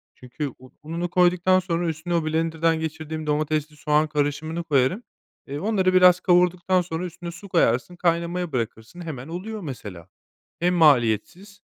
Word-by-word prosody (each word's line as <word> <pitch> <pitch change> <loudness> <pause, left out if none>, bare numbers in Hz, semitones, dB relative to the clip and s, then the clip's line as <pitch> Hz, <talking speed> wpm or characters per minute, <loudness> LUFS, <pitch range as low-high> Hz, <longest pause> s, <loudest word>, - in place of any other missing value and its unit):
çünkü 130 +4 -6
u 130 0 -16
ununu 170 +3 -3
koyduktan 180 +1 +3
sonra 175 -1 -2
üstüne 160 +2 -3
o 165 -2 0
blenderdan 160 +1 0
geçirdiğim 160 0 -5
domatesli 150 0 -1
soğan 150 +2 +2
karışımını 150 +3 -2
koyarım. 150 - +1 0.4
Eee, 140 +2 -5
onları 190 -2 +1
biraz 180 -1 +6
kavurduktan 180 0 +3
sonra 170 0 -4
üstüne 175 0 -7
su 190 +4 -12
koyarsın, 165 -1 +1
kaynamaya 175 0 -1
bırakırsın. 115 +5 -5
Hemen 145 -6 -7
oluyor 200 +6 -6
mesela. 105 - -8 0.5
Hem 180 +1 +2
maliyetsiz 160 - +2
165 Hz, 145 wpm, -24 LUFS, 150-180 Hz, 0.5 s, biraz